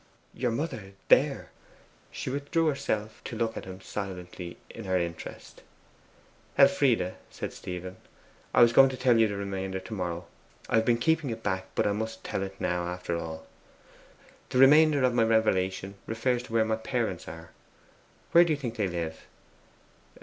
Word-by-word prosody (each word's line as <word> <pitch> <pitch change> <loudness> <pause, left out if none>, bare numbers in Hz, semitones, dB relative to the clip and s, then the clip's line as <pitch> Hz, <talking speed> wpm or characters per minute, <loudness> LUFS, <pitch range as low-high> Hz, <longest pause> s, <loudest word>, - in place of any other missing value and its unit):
'Your 125 0 -1
mother 115 -6 -4 0.2
THERE!' - - +3 0.6
She - - -5
withdrew 145 +4 0
herself 110 -8 -2
to - - -5
look 115 -1 -1
at - - -6
him 95 0 -9
silently 90 -3 -6
in 115 - -9
her 95 -1 +1
interest. 85 -1 -6 1.0
'Elfride,' 130 - +4
said - - -6
Stephen, 90 +1 -7 0.6
'I 120 - +8
was 120 0 +5
going 135 +2 +8
to 130 - -6
tell 125 -2 +4
you 110 - +5
the 100 - -4
remainder 95 -1 -3
to 110 - -8
morrow 90 -3 -3 0.4
I - - +2
have 110 - +3
been 120 0 +3
keeping 160 +3 +1
it 115 -1 -5
back 95 -2 -1
I 105 - +2
must 110 +2 -4
tell - - -3
it 95 0 -6
now, 90 0 -1
after 90 -1 -3
all. 80 -1 -5 1.0
The - - -1
remainder 145 +1 +6
of 125 -1 +3
my 120 - +3
revelation 100 -4 +1
refers 120 +2 0
to 125 - -11
where 115 -1 +3
my 110 0 0
parents 110 -5 -2
are. 80 0 -9 0.8
Where 170 - +8
do 170 - 0
you - - -1
think 120 -5 -5
they 105 -3 +1
live? 85 -2 -5
110 Hz, 170 wpm, -28 LUFS, 95-125 Hz, 1.0 s, I